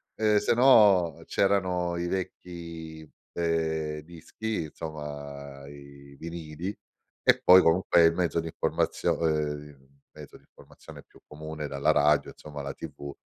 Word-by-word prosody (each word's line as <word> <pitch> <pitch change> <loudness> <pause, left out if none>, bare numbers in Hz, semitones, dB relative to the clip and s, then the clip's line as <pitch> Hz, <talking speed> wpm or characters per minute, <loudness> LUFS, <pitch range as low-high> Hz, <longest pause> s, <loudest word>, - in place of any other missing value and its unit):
ehm, 105 -1 +2
se 105 - +1
no 105 - +5
c'erano 90 -3 +1
i 85 0 -2
vecchi, 85 -4 -6 0.2
ehm, 80 -2 -1
dischi 85 +6 -5
insomma, 70 -3 -8
i 70 -1 -14
vinili 85 +3 -6 0.5
e - - +4
poi 90 +1 +8
comunque 85 0 +4
il 80 0 +5
mezzo 85 -2 0
di 80 - -7
informazio 80 0 -1
ehm, 75 -3 -3 0.2
mezzo - - -13
di - - -17
informazione - - -15
più - - -22
comune, 80 0 -8
era 70 -1 -5
la 75 +3 +4
radio 75 0 +3
insomma, 75 -1 -9
la 70 0 -5
TV, 70 0 -8
80 Hz, 135 wpm, -27 LUFS, 75-85 Hz, 0.5 s, poi